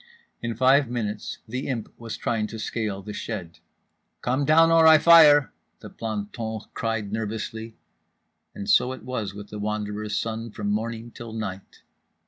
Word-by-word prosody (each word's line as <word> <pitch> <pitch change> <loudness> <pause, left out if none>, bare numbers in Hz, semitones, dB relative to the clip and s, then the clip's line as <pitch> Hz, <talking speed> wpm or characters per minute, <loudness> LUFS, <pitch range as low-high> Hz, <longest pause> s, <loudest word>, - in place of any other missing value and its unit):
In 115 -1 -3
five 130 +2 +4
minutes 110 -4 -4
The 125 +4 -4
Imp 120 -6 -4
was 115 -2 -6
trying 110 -2 -1
to 110 - -8
scale 105 -3 -3
the 105 +1 -7
shed. 95 -9 -6 0.6
"Come 130 +3 0
down 165 +2 +5
or 165 -1 +6
I 160 0 +9
fire," 150 -3 +7 0.3
the - - -11
planton 110 0 -4
cried 115 -3 -2
nervously… 110 +1 -4 0.8
and 100 - -6
so 130 - +4
it 130 - -10
was 110 -6 -4
with 105 0 -9
The 105 - -6
Wanderer's 105 0 -3
son 115 +1 -3
from 105 -1 -3
morning 115 +2 -3
till 115 -1 -9
night. 100 -4 -7
115 Hz, 155 wpm, -25 LUFS, 105-125 Hz, 0.8 s, I